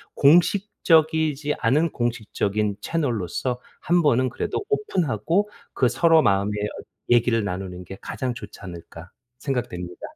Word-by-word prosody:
'공식적이지 160 -3 +3
않은 145 +7 +2
공식적인 105 -3 -1
채널로서 125 - -2 0.2
1 175 +1 +2
번은 130 -4 +3
그래도 270 - -3
오픈하고 205 - 0 0.2
그 125 - +2
서로 160 +5 +4
마음의 100 -2 +2
어 105 - -4 0.3
얘기를 120 -1 +3
나누는 90 -1 -5
게 95 - -9
가장 125 -2 -3
좋지 105 -2 -10
않을까.' 85 -2 -10 0.3
생각됩니다. 90 -10 -4
125 Hz, 295 characters per minute, -24 LUFS, 105-160 Hz, 0.3 s, 서로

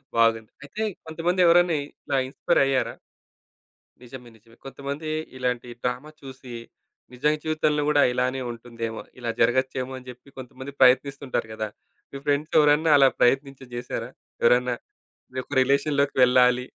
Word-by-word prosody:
బాగుంది. 115 -1 +2
అయితే 145 +10 -7 0.2
కొంతమంది 165 +3 -2
ఎవరైనా 175 0 +5
ఇట్లా 140 - -4
ఇన్‌స్పైర్ 140 +5 +1
అయ్యారా? 135 -1 0 1.1
నిజమే. 125 0 -11
నిజమే. 115 +2 -23
కొంతమంది 140 +3 -6 0.3
ఇలాంటి 125 -1 -2 0.2
డ్రామ 125 +1 -2 0.2
చూసి, 130 -2 -10 0.6
నిజం 150 +5 +1
జీవితంలో 155 -1 0
గూడా 145 -1 +4
ఇలానే 130 +1 -1
ఉంటుందేమో, 115 -1 -6 0.2
ఇలా 120 -1 -2
జరగచ్చేమో 130 +2 +1
అని 130 0 -13
జెప్పి 125 +3 -14
కొంతమంది 130 +2 -9
ప్రయత్నిస్తుంటారు 135 -2 +2
గదా! 110 -1 -4 0.4
మీ 140 - -6
ఫ్రెండ్స్ 145 +2 0
ఎవరన్నా 150 +2 +4
అలా 135 -1 +7
ప్రయత్నించి 135 +1 +1
జేశారా? 120 0 -5 0.3
ఎవరన్నా 125 +1 +3 0.6
మీ - - -6
యొక్క 145 - -8
రిలేషన్‌లోకి 140 +1 +1
వెళ్ళాలి. 125 0 +4
130 Hz, 130 wpm, -25 LUFS, 125-145 Hz, 1.1 s, అలా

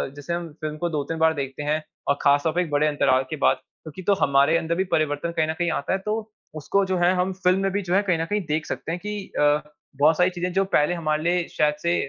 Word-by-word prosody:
जैसे 145 +4 -5
हम 170 -1 -4
फ़िल्म 155 0 -4
को 175 +2 -2
2-3 155 0 -3
बार 160 0 +4
देखते 140 -1 -5
हैं 150 +1 0 0.3
और 140 - +3
खासतौर 145 +3 +3
पर 180 - +1
एक 175 - -3
बड़े 145 +1 +2
अंतराल 135 -3 +2
के - - -3
बाद - - +4 0.3
क्योंकि 155 +3 -9
तो 200 - +5
हमारे 140 +1 +3
अंदर 170 0 -1
भी 185 - +1
परिवर्तन 155 +1 0
कहीं 155 -1 +2
न 160 - -1
कहीं 175 -1 +1
आता 140 +2 -1
है। 190 - 0
तो 215 +1 -3 0.2
उसको 195 +6 0
जो 190 -1 -1
है 175 +1 +3
हम 180 +1 0
फ़िल्म 185 0 +2
में 195 0 0
भी 205 +1 -1
जो 180 -2 -3
है 200 - +5
कहीं 170 - +2
न - - -1
कहीं 205 +4 -1
देख 155 +1 -1
सकते - - -5
है 170 - -2
कि 210 +3 -5 0.2
अ, 150 0 +4 0.4
बहुत 155 +2 +5
सारी 180 +1 +4
चीज़े 180 -1 -3
हैं 180 - -5
जो 195 - +4
पहले 150 +4 +3
हमारे 155 -3 -1
लिए 175 0 +1
शायद 150 -1 +3
से 170 0 +2
165 Hz, 275 wpm, -24 LUFS, 150-180 Hz, 0.4 s, तो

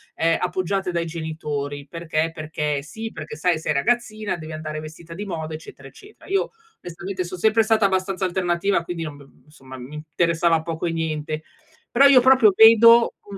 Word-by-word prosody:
ehm, 165 0 +2
appoggiate 185 +1 -2
dai 170 -1 -2
genitori. 150 -3 -5
Perché? 165 0 -2
Perché 150 -2 -3
sì, 220 +9 -7
perché, 155 0 -8
sai, 165 +1 0
sei 150 - -1
ragazzina, 215 +3 -1
devi 155 -1 -8
andare 155 0 -5
vestita 160 +2 -10
di 205 +4 -6
moda, 160 -4 -5
eccetera, 140 -3 -10
eccetera. 400 - -17
Io 390 0 0 0.3
onestamente 185 +2 -5
son 180 +1 -7
sempre 220 +2 +3
stata 220 -2 +2
abbastanza 190 0 -1
alternativa 175 0 0
quindi 170 -1 -5
non 150 -2 -7
b 140 -1 -16 0.2
insomma, 130 -3 -13
mi 130 +4 -10
interessava 165 +2 0
poco 165 +1 -4
e 170 - -1
niente. 155 -1 -3 0.5
Però 275 +3 +5
io 260 -3 +7
proprio 255 -6 +5
vedo 230 +1 +7 0.2
un 200 - -7
170 Hz, 175 wpm, -22 LUFS, 155-195 Hz, 0.5 s, io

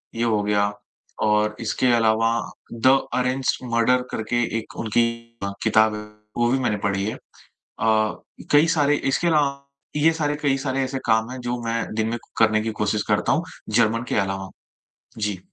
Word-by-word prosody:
ये 115 - -1
हो 110 -3 +2
गया 100 0 +1 0.6
और 105 0 +2
इसके 120 +3 +1
अलावा 115 0 +3 0.4
'द 115 +2 +1 0.3
अरेंज्ड 130 0 0
मर्डर' 120 +2 +3
करके 120 +2 -1 0.2
एक - - -12
उनकी 115 +2 +3 0.6
किताब 110 -1 +4
है 105 - -5 0.4
वो 120 0 +2
भी 135 - +2
मैंने 110 -5 0
पढ़ी 100 0 0
है। 110 - -3 1.3
कई 150 +3 +6
सारे 145 -1 +3 0.2
इसके 170 - +1
अलावा 140 -4 +1 0.3
ये 155 +2 +4
सारे 150 -2 -1
कई 135 -2 +2
सारे 135 -1 -1
ऐसे 130 +1 -3
काम 110 0 +2
हैं, 130 - -6
जो 120 0 -3
मैं 115 -1 -2
दिन 110 0 0
में 120 - -2 0.2
करने 110 -1 +4
की 110 +1 -2
कोशिश 105 0 +1
करता 105 -1 +1
हूँ 165 - +2 0.3
जर्मन 115 0 +2
के - - 0
अलावा, 95 0 -4 0.7
जी। 105 -3 -2
115 Hz, 165 wpm, -23 LUFS, 110-130 Hz, 1.3 s, कई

